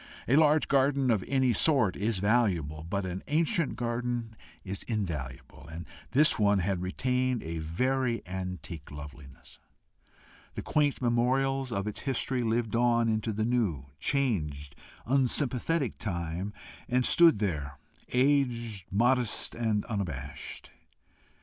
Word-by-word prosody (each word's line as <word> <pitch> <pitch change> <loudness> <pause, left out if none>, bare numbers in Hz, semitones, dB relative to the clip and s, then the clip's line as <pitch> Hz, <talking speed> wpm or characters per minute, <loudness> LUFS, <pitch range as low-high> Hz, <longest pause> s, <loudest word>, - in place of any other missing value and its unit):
A 130 - +4
large 155 0 +4
garden 135 -1 +2
of 105 -5 +1
any 130 -3 +2
sort 125 - +4
is 105 +1 -1
valuable, 95 -8 +1
but 100 +1 -1
an 90 +1 -4
ancient 165 - +1
garden 120 -1 -3 0.3
is 95 0 -5
invaluable, 75 - -5
and 85 +1 -7 0.2
this 150 0 +4
one 105 -1 +4
had 95 -1 -1
retained 125 +6 -1
a 80 0 -4
very 120 +8 -1
antique 90 -4 -6
loveliness. 70 -2 -12 1.0
The - - -5
quaint 145 -3 +1
memorials 130 +2 +1
of 100 -3 -2
its 105 - -4
history 130 -1 -1
lived 115 -1 0
on 120 -1 +3
into 110 0 0
the 110 +1 -1
new, 95 - -1
changed, 75 - -1 0.3
unsympathetic 135 +2 +1
time, 85 0 -3 0.4
and 125 0 +2
stood 170 -5 +6
there, 75 -9 -3 0.3
aged, 125 - +1
modest, 120 +3 +1
and 110 -3 -1
unabashed. 80 - -5
115 Hz, 125 wpm, -29 LUFS, 90-130 Hz, 1.0 s, stood